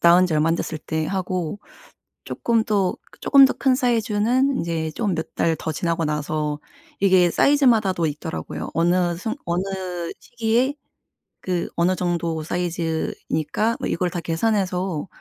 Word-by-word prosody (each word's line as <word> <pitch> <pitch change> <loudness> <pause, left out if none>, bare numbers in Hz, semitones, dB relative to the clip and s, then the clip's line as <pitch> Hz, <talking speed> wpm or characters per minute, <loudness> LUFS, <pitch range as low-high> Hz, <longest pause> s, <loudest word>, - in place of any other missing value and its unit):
나온 175 +2 +6
지 170 - -3
얼마 155 +2 +2
안 165 - +3
됐을 160 -2 -3
때 160 0 -3
하고 185 -2 -2 0.7
쪼끔 230 -2 0
또 200 -4 0
그 - - -20
쪼끔 275 -2 +7
더 - - +1
큰 265 -2 +2
사이즈는 245 +2 +1
인제 160 -2 -2
좀 205 +2 -1
몇 160 - -5
달 165 -1 +2
더 160 - -3
지나고 165 +1 -1
나서 150 0 -2 0.4
이게 185 -3 +5
사이즈마다도 225 - +3
있더라고요. 150 +2 -5
어느 175 +1 +2
순 220 +8 -4
어느 170 +2 0 0.6
시기에 240 +3 0 0.7
그 180 -2 -1
어느 175 +2 +2
정도 170 -3 -1
사이즈이니까 170 +3 -2
뭐 - - -2
이걸 180 +1 0
다 175 - -4
계산해서 180 0 -1
180 Hz, 290 characters per minute, -22 LUFS, 165-215 Hz, 0.7 s, 쪼끔